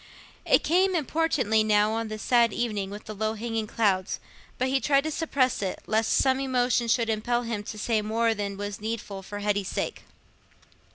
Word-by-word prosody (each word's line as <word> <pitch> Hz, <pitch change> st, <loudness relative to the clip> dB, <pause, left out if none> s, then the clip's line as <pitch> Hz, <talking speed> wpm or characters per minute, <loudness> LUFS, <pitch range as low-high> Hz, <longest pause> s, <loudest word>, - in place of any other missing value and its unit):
It -, -, +4 dB
came 370 Hz, +4 st, +3 dB
importunately 295 Hz, -8 st, +1 dB
now, 210 Hz, 0 st, +3 dB
on 225 Hz, 0 st, -2 dB
this 215 Hz, 0 st, -6 dB
sad 235 Hz, -2 st, +4 dB
evening, 210 Hz, -5 st, -2 dB
with 205 Hz, +2 st, -8 dB
the 215 Hz, -, -6 dB
low 215 Hz, +1 st, -2 dB
hanging 225 Hz, -1 st, -3 dB
clouds, 195 Hz, -5 st, 0 dB, 0.4 s
but 255 Hz, -, 0 dB
he 270 Hz, +1 st, +2 dB
tried 275 Hz, 0 st, +3 dB
to 315 Hz, -, -2 dB
suppress 280 Hz, -7 st, 0 dB
it, 190 Hz, -2 st, -3 dB
lest 220 Hz, +1 st, +1 dB
some 265 Hz, 0 st, +3 dB
emotion 250 Hz, -2 st, +1 dB
should 230 Hz, 0 st, +2 dB
impel 240 Hz, +2 st, 0 dB
him 230 Hz, -3 st, -3 dB
to 215 Hz, -, -6 dB
say 220 Hz, 0 st, 0 dB
more 225 Hz, +2 st, +1 dB
than 200 Hz, -2 st, -4 dB
was 205 Hz, 0 st, -5 dB
needful 215 Hz, -3 st, -4 dB
for 205 Hz, +2 st, -7 dB
Hetty's 205 Hz, -2 st, 0 dB
sake. -, -, -3 dB
225 Hz, 185 wpm, -27 LUFS, 210-250 Hz, 0.4 s, It